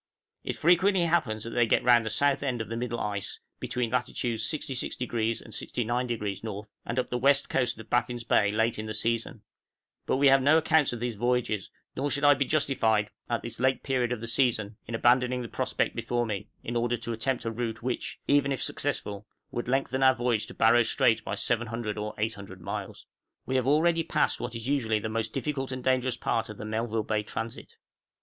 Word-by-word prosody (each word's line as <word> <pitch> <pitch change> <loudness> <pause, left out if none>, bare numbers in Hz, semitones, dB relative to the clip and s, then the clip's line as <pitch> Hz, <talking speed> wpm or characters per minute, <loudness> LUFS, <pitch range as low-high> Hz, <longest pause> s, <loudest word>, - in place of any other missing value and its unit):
It - - -3
frequently 180 +3 +4
happens 125 -11 +1
that 115 - -6
they 120 -1 +2
get - - +3
round 120 -2 +5
the - - 0
south 140 +4 +2
end 130 -4 -1
of 110 - -4
the 115 - -3
middle 120 0 -3
ice, 100 -2 -3 0.2
between 120 -2 -2
latitudes 120 -2 -1
66° 120 -5 -2
and - - -12
69° 120 -4 -2
N., 105 -2 -5 0.2
and 115 - -3
up 130 - -1
the 125 - 0
west 140 +2 +3
coast 125 -3 0
of 110 0 -10
Baffin's 120 0 0
Bay 105 -2 +3
late 110 +1 +1
in 110 - -4
the 110 - -4
season; 115 0 -1 0.6
but - - +2
we 140 - +3
have 135 0 +6
no 145 +4 +5
accounts 160 -2 +3
of 120 -2 -5
these 120 -1 -1
voyages, 120 -2 0 0.3
nor 145 +2 -1
should 140 +1 -1
I 145 0 +8
be 140 0 0
justified, 115 -8 +1 0.2
at 120 -1 -1
this 115 0 -6
late 130 +1 +1
period 125 -3 0
of 120 -3 -2
the 115 - -5
season, 115 -3 +1
in 115 - -3
abandoning 125 +2 +3
the - - -5
prospect - - -1
before 120 +1 -1
me, 105 -4 -4
in 120 - -4
order 120 +1 +1
to 120 - -3
attempt 120 +2 -1
a 115 - -1
route 115 0 -4
which, 125 0 -3
even 140 -1 +3
if 135 - -1
successful, 105 +1 -2 0.2
would 120 - -3
lengthen 130 0 0
our 130 -1 +6
voyage 120 -3 0
to - - -11
Barrow 115 +2 +5
Strait 115 0 +2
by 100 - -3
700 115 -1 -1
or 105 0 -4
800 100 -3 -4
miles. 85 - -6 0.4
We 130 - -2
have 130 -1 +1
already 165 +3 +4
passed 165 - +1
what 120 -1 -4
is 115 +1 -5
usually 120 -6 +1
the 110 +1 -3
most 110 0 -2
difficult 135 0 -2
and 130 -1 -5
dangerous 130 -1 +1
part 115 - -1
of 105 - -8
the 105 - -7
Melville 110 0 -1
Bay 105 0 0
transit. 110 +2 -6
120 Hz, 210 wpm, -28 LUFS, 110-130 Hz, 0.6 s, I